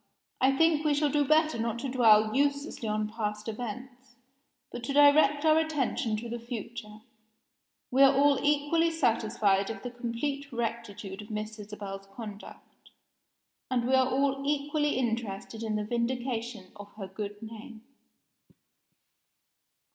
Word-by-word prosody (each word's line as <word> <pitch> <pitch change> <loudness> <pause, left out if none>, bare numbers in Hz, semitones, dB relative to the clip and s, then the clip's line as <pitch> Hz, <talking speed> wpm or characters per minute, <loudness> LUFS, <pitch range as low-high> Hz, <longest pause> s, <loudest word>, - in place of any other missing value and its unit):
I 270 +1 +3
think 325 -1 +3
we 300 -2 +2
shall 290 0 +1
do 295 +1 +3
better 310 -2 +3
not 230 0 -1
to 270 - -4
dwell 220 -4 +4
uselessly 280 -4 0
on 215 0 0
past 210 -1 -4
events, 245 +3 -7 0.6
but 240 - -7
to 275 - -2
direct 290 +1 +5
our 315 0 +5
attention 275 -8 -1
to 235 +2 -6
the 235 +1 -5
future. 230 -2 -7 0.9
We 260 +2 +3
are 275 -1 +8
all 280 0 +4
equally 295 +3 +2
satisfied 220 -9 +1
of 220 -3 -6
the 245 - -5
complete 270 +4 -4
rectitude 220 -4 -4
of 210 - -12
Miss 215 0 -5
Isabel's 200 -1 -8
conduct, 210 -3 -11 0.8
and 245 -2 0
we 260 - +1
are 260 0 +4
all 275 +1 +1
equally 295 0 0
interested 225 -3 -3
in 220 -1 -2
the 210 - -1
vindication 235 -3 -3
of 205 0 -11
her 205 -2 -7
good 205 +2 -6
name." 225 0 -10
235 Hz, 140 wpm, -29 LUFS, 215-280 Hz, 0.9 s, are